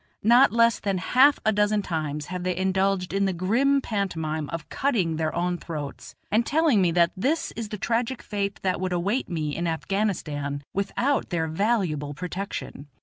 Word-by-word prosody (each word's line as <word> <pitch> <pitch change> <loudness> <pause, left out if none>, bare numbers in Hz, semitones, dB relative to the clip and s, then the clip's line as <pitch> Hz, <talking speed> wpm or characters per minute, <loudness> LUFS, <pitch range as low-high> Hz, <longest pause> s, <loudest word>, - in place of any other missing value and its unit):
Not 240 +5 +6
less 230 -1 +3
than 195 -2 -1
half 260 +10 +4
a 215 - +4
dozen 210 0 +2
times 150 -4 -3
have 180 -1 -3
they 180 0 -1
indulged 190 0 0
in 195 0 +2
the 190 - 0
grim 245 +11 +2
pantomime 160 - -2
of 165 -2 -5
cutting 190 - 0
their 155 -1 0
own 175 0 -1
throats, 150 -4 -7 0.2
and 220 +3 +3
telling 295 -6 +3
me 180 - +3
that 170 -1 +4
this 315 - 0
is 225 -2 -6
the 210 - -5
tragic 235 +4 -1
fate 200 -1 -3
that 185 -1 0
would 185 -1 -1
await 200 +9 -1
me 155 -4 -2
in 170 0 -2
Afghanistan 160 -6 -2
without 245 +8 0
their 165 -3 -1
valuable 160 -6 0
protection. 180 -3 -5
190 Hz, 175 wpm, -25 LUFS, 165-220 Hz, 0.2 s, Not